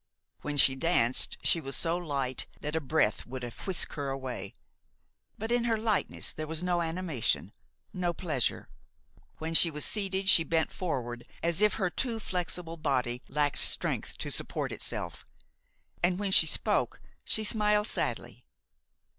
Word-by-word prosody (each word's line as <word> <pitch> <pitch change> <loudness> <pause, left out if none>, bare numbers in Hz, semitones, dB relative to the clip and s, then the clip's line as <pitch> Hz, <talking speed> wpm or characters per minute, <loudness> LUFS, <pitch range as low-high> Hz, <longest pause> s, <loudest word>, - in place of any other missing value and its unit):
When 150 0 -4
she 135 -1 +7
danced 130 -4 +2
she 165 - +3
was 135 -2 -3
so 165 0 0
light 140 -7 -3
that 150 0 -4
a 160 - 0
breath 145 -6 +1
would 130 0 -6
have 115 -3 -7
whisked 190 -3 +1
her 145 -2 -3
away; 130 -7 -5 0.8
but 220 +2 -4
in 240 0 +2
her 225 -2 +1
lightness 215 -2 -1
there 155 0 -5
was 160 +2 -3
no 175 -1 +1
animation, 165 -6 -1 0.4
no 180 -1 0
pleasure. 155 - -2 0.7
When 160 +1 -4
she 165 +1 +6
was 150 -2 -2
seated 195 -2 -1
she 165 - +9
bent 160 0 0
forward 120 -9 -4 0.2
as 170 +3 +1
if 210 0 +4
her 185 -4 -1
too 235 +1 -2
flexible 180 -4 -4
body 125 -5 -1
lacked 145 -1 0
strength - - +2
to - - -5
support - - -3
itself, - - -5 0.8
and 180 +1 +2
when 200 -1 -2
she - - +8
spoke - - 0 0.2
she 220 - -1
smiled 210 0 +2
sadly. - - -2
165 Hz, 155 wpm, -29 LUFS, 135-185 Hz, 0.8 s, she